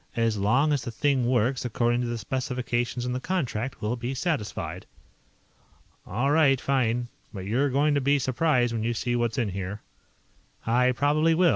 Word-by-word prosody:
As 115 -1 +1
long 125 +10 +2
as 140 - 0
the 120 - -5
thing 130 +1 +1
works 125 +1 +1
according 120 0 +1
to 120 - -2
the 120 0 -2
specifications 125 +1 -2
in 125 - -2
the 125 - -2
contract, 130 -9 -3
we'll 110 +3 0
be 125 +2 -4
satisfied." 140 - -3 1.2
"All 125 +9 0
right. 145 -4 +4
Fine. 125 -3 0 0.2
But 95 -3 -7
you're 130 +8 +1
going 145 +3 +2
to 140 - +1
be 140 +2 +3
surprised 130 -2 +1
when 115 - -2
you 115 +1 -1
see 120 +2 -1
what's 120 -2 0
in 120 -5 0
here." 95 +2 -5 0.8
"I 125 +3 +3
probably 155 +5 +2
will. 175 +1 +4
125 Hz, 175 wpm, -26 LUFS, 115-140 Hz, 1.2 s, right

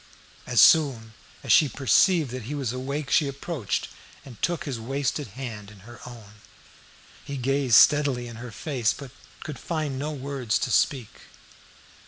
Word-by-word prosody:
As - - +1
soon 125 -8 +4 0.3
as - - -2
she 150 - +6
perceived 140 - +2
that 125 -3 -6
he 145 +5 -5
was 130 -5 -3
awake 140 +3 -4
she 150 - +3
approached 140 - -4 0.4
and 125 -6 -13
took 175 -1 -1
his 135 -6 -5
wasted 135 +4 -3
hand 110 -6 -7
in 105 -2 -16
her 120 +4 -13
own. 105 -4 -13 0.8
He 140 - -6
gazed 135 -2 +1
steadily 145 -5 +5
in 115 -1 -10
her 125 +1 -8
face, 120 -1 -1
but 140 -3 -10 0.3
could 150 -4 -7
find 155 -5 -3
no 150 +2 -3
words 135 -5 -2
to 135 -2 -3
speak. 125 -4 -1
135 Hz, 160 wpm, -25 LUFS, 120-145 Hz, 0.8 s, she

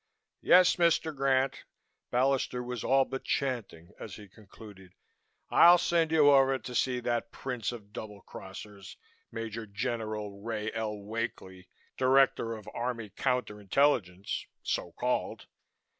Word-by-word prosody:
"Yes, 180 0 +6
Mr. 165 -2 +2
Grant 135 -1 +1 0.2
" - - -52
Ballister 125 -1 +1
was 125 -2 -5
all 135 0 +3
but 135 - -6
chanting 110 - -3
as 105 - -8
he 105 -1 -12
concluded 100 -2 -15 0.6
"I'll 175 +1 +8
send 165 -2 +1
you 150 -3 +6
over 135 -1 +4
to 125 -1 -9
see 125 0 +1
that 120 -1 -2
prince 125 -5 -4
of 105 -4 -11
double 105 -3 -8
crossers, 100 +1 -10 0.4
Major 115 0 -5
General 105 0 -4
Ray 110 -1 -3
L. 110 -2 -3
Wakely, 100 -3 -6 0.3
director 130 -3 +3
of 105 - -13
Army 115 -3 -4
Counter 125 -5 -2
Intelligence, 100 -5 0 0.2
so - - -2
called. - - -2
115 Hz, 130 wpm, -30 LUFS, 105-135 Hz, 0.6 s, I'll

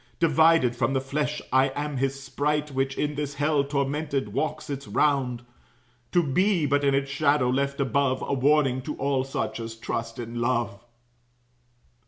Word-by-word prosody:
Divided 160 -5 +4
from 120 +2 0
the 135 - +2
flesh, 145 +3 -2
I 130 +1 +5
am 145 -1 -3
his 135 +1 -1
sprite, 150 +2 -1
Which 135 0 -1
in 150 0 -1
this 145 -1 -4
hell, 145 -1 +2
tormented, 140 0 -2
walks 155 -1 -2
its 140 -2 -5
round, 130 -5 +1 0.7
To 175 -1 +3
be, 175 +4 +2
but 145 0 +1
in 140 -1 +3
its 135 0 -1
shadow 140 -3 +2
left 140 +2 -1
above, 135 0 +1
A - - -2
warning 135 -1 +2
to 150 +3 -5
all 135 -1 0
such 135 -2 -3
as 115 0 -6
trust 115 0 -4
in 120 0 -5
love." 120 -3 -1
140 Hz, 165 wpm, -26 LUFS, 130-150 Hz, 0.7 s, I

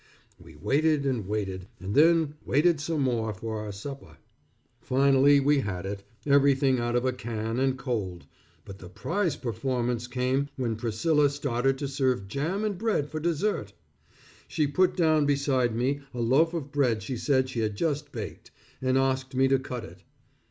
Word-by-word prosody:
We 80 -2 -15
waited, 145 - +1
and 125 -8 -1
waited, 95 -3 -3
and 95 +3 -5
then 160 0 +4
waited 155 +4 +3
some 155 0 -1
more 115 -5 0
for 110 +2 -4
our 105 -1 -5
supper. 135 +8 -9 0.6
Finally, 140 +2 +4
we 145 +1 +3
had 95 -7 -3
it, 100 0 -4 0.2
everything 140 -2 +4
out 120 0 -1
of 120 +1 +1
a 130 - +1
can 115 -1 -3
and 135 0 +1
cold, 110 -10 -3 0.4
but 95 -1 -10
the 90 - -10
prize 165 - -1
performance 120 0 -2
came 130 +3 0
when 120 -4 -1
Priscilla 140 +7 +2
started 135 -2 0
to 140 - -3
serve 130 -7 0
jam 160 - -2
and 200 -4 -2
bread 205 -10 0
for 155 - -3
dessert. 165 - -1 0.7
She 155 - 0
put 180 +8 +2
down 155 -4 +3
beside 135 -5 +1
me, 135 +4 0
a - - -4
loaf 140 +9 +3
of 145 -4 -4
bread 125 -8 +1
she 125 +5 -4
said 130 +1 +1
she 130 -2 -4
had 110 -2 -1
just 145 +2 -2
baked, 110 -5 -7 0.3
and 130 0 +2
asked 130 0 0
me 135 +1 +4
to 135 0 +3
cut 125 -3 -6
it. 90 +1 -12
130 Hz, 175 wpm, -27 LUFS, 115-145 Hz, 0.7 s, then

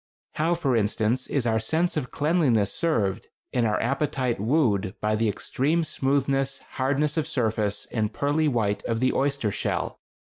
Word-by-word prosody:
How, 165 +3 +1
for 140 -7 0
instance, 110 +3 0
is 140 -4 0
our 110 -1 +2
sense 165 +9 0
of 145 -5 -2
cleanliness 145 - +2
served 110 - 0 0.3
and 120 -3 +2
our 105 - +1
appetite 130 -2 0
wooed 105 -5 +1
by 105 0 +1
the 110 0 +1
extreme 145 - 0
smoothness, 135 -2 0
hardness 140 +3 0
of 155 -1 0
surface, 110 -7 -1
and 110 -2 0
pearly 145 +5 +1
white 110 -7 0
of 115 -1 -1
the 130 +1 +2
oyster 135 -6 0
shell! - - -2
130 Hz, 155 wpm, -25 LUFS, 110-145 Hz, 0.3 s, our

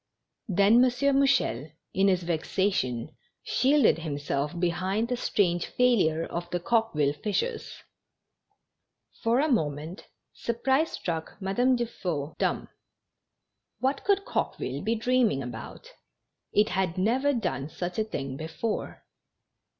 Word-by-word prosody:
Then 205 +5 +5
M. 255 - +5 0.3
Mouchel, 270 - +2 0.2
in 195 +1 +3
his 185 -2 +2
vexation, 160 - -1 0.3
shielded 270 - +3
himself 145 0 -3
behind 185 +6 0
the 250 - +1
strange 175 -7 +1
failure 185 -11 +2
of 175 0 -5
the 175 - -1
Coqueville 175 -9 +1
fishers. 220 - -3 1.4
For 230 +2 +2
a 300 - +3
moment, 155 - -2 0.3
surprise 265 +6 0
struck 165 +2 -4
Madame 245 +7 +2
Dufeu 175 -11 -3
dumb. - - -1 1.1
What 270 +2 0
could 400 0 +2
Coqueville 135 +3 -2
be 225 +3 +1
dreaming 230 - +2
about? 120 -1 -8 0.6
It 210 +1 +3
had 185 -2 -1
never 250 +9 +2
done 175 - -2
such 175 +4 -4
a - - +3
thing 135 -10 -5
before. 160 +8 -4
190 Hz, 115 wpm, -27 LUFS, 160-235 Hz, 1.4 s, Then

